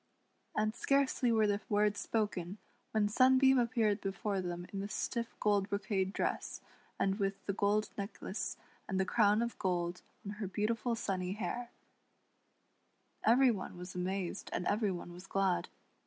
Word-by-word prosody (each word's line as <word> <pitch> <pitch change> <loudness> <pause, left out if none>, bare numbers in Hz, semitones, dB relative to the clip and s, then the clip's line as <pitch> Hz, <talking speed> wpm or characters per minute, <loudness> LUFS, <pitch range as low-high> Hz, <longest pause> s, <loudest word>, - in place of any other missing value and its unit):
And 215 0 +2
scarcely 275 -3 +2
were 220 -1 +4
the 205 0 +1
words 205 0 +2
spoken 205 -4 -1 0.3
when 215 -2 +2
Sunbeam 260 +3 +5
appeared 225 -4 +2
before 195 0 -1
them 175 -1 -4
in 195 - -2
the 200 - -3
stiff 230 +1 -2
gold 205 -2 +2
brocade 200 -2 0
dress, - - -2 0.4
and 195 +2 +1
with 195 0 -1
the 200 - 0
gold 205 +2 +2
necklace 200 0 -4 0.3
and 190 -1 0
the 190 - +2
crown 210 +2 +4
of 235 - -4
gold 175 -2 -1 0.2
on 200 - -3
her 210 -2 -3
beautiful 220 +5 0
sunny 185 -4 -2
hair, 235 +3 -3 1.6
Eveiy 250 +2 +6
one 185 -3 -6
was 180 +1 -7
amazed 180 0 -3
and 180 - -2
every 210 +2 +2
one 175 -1 -6
was 180 +2 -11
glad. 195 -2 +1
205 Hz, 155 wpm, -34 LUFS, 190-225 Hz, 1.6 s, Eveiy